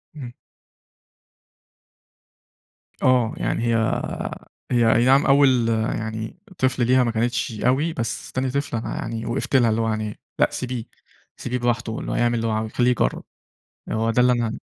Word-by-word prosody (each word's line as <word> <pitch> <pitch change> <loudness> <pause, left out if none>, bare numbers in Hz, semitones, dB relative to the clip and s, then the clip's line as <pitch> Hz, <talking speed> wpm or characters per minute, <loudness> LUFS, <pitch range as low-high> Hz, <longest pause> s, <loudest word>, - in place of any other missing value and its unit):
إمم. 125 -5 -8 2.7
آه، 125 -3 +3
يعني 115 - -1
هي 115 -1 +2 1.0
هي 120 -2 +4
أي 120 +1 +3
نَعم 135 +2 +5
أول 130 -4 +4
يعني 110 +3 -2 0.2
طفل 130 -2 +1
ليها 130 0 +4
ما 120 - 0
كانتش 115 -1 -1
أوي، 145 +6 +2
بس 115 -4 -4
تاني 130 0 -1
طفل 140 -2 -2
أنا 115 - -4
يعني 115 0 -4
وقَفت 135 +3 -2
لها، 120 -3 +5
اللي 110 +1 +1
هو 115 - 0
يعني، 110 -1 -3 0.2
لأ، - - +4
سيبيه، 125 -2 -4 0.5
سيبيه 125 0 -3
براحته 120 -2 -1
اللي - - -5
هو - - -2
يعمل 120 0 +2
اللي 115 0 -1
هو - - 0
عاوزه، 110 0 -2
خلّيه 125 0 +3
يجرّب. 125 - 0 0.7
آآ، - - -2
هو 110 +1 0
ده 125 - +3
اللي 125 0 +4
أنا 120 -2 -2
120 Hz, 165 wpm, -23 LUFS, 115-125 Hz, 2.7 s, نَعم